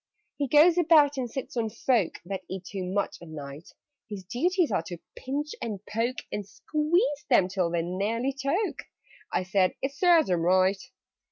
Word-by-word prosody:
"He 285 - -1
goes 320 +6 +6
about 305 -4 +5
and 250 -2 -2
sits 265 +2 -6
on 225 -2 0
folk 225 -3 0
That 190 +1 -4
eat 185 -1 -6
too 195 -1 -5
much 195 +3 -2
at 170 - -11
night: 145 0 -9 0.4
His 200 -3 -6
duties 330 - 0
are - - +1
to 175 - -6 0.2
pinch, 290 +3 -3
and 215 -4 -4
poke, 230 +4 -2
And 210 - -3
squeeze 300 - 0
them 215 -8 +5
till 185 -2 -1
they 170 -1 -1
nearly 215 +9 -1
choke." 280 +10 -2 0.5
(I - - 0
said 185 0 +1
"It 270 +1 -3
serves 335 - +4
them 175 -2 +1
right!") 185 +3 +3
230 Hz, 175 wpm, -27 LUFS, 185-290 Hz, 0.5 s, goes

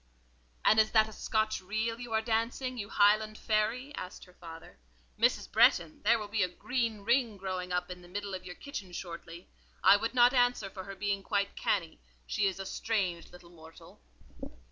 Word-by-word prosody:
"And 215 - +6
is 215 0 +5
that 220 -1 +5
a 220 - -10
Scotch 215 0 -1
reel 220 +4 -2
you 240 -1 -8
are 220 0 +1
dancing, 240 +3 -1
you 205 0 -5
Highland 215 +1 +3
fairy?" 225 +6 -1
asked 185 -9 -8
her 180 - -19
father. 165 - -12 0.4
"Mrs. - - +2
Bretton, 165 -2 +4
there 230 +3 +4
will 210 -2 -6
be 210 +1 -1
a 185 - +3
green 230 +2 -2
ring 235 0 +1
growing 185 -1 -4
up 180 0 -1
in 180 0 -8
the 175 - -14
middle 200 +2 -5
of 185 - -5
your 180 - -8
kitchen 205 -11 -8
shortly. 170 0 -8 0.4
I 200 - +8
would 225 +4 -3
not 245 +1 +6
answer 245 -6 +2
for 190 -1 -8
her 195 0 -8
being 200 0 -1
quite 200 0 -1
cannie: 170 -5 -1 0.3
she 205 -2 +1
is 190 0 -3
a 195 - -5
strange 190 -5 -2
little 175 -1 -15
mortal." 160 -1 -15
205 Hz, 190 wpm, -31 LUFS, 180-225 Hz, 0.4 s, I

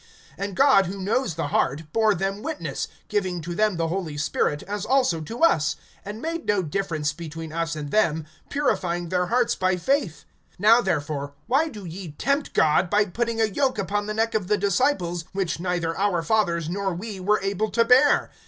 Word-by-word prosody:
(8)And 200 -1 -3
God 265 -8 +5
who 195 +2 -5
knows 205 -1 0
the 160 -3 -2
heart 150 +3 -1
bore 220 -2 +3
them 195 +3 -2
witness, 315 +4 -4 0.2
giving 190 -4 -1
to 175 +2 -5
them 210 0 +1
the 165 -1 0
Holy 165 -4 -3
Spirit, 145 0 0
as 205 0 -4
also 255 -11 +2
to 230 - -5
us; 155 - +3 0.3
(9)and 210 +2 -6
made 330 +2 -4
no 205 -2 +2
difference 155 -3 -2
between 160 0 -7
us 165 0 -2
and 145 -2 -6
them, 160 -7 +2 0.2
purifying 180 - -1
their 180 0 0
hearts 240 +2 +2
by 185 -1 +1
faith. 180 - -1 0.3
(10)Now 225 +4 +6
therefore 145 -5 -2
why 275 +7 +2
do 210 -8 -9
ye 170 -1 -7
tempt 280 +3 0
God, 160 +3 +3
by 205 +2 +3
putting 230 +4 -2
a 225 - +4
yoke 260 +5 0
upon 205 +2 -1
the 215 - -3
neck 225 +1 +1
of 210 -4 -1
the 210 - +2
disciples, 190 - 0
which 190 -4 -2
neither 175 -2 -1
our 195 -4 0
fathers 170 -6 +1
nor 190 +1 -2
we 200 +2 -6
were 210 +3 +2
able 200 +2 -1
to 230 +1 +2
bear? 260 +5 +4
195 Hz, 190 wpm, -24 LUFS, 170-220 Hz, 0.3 s, 10)Now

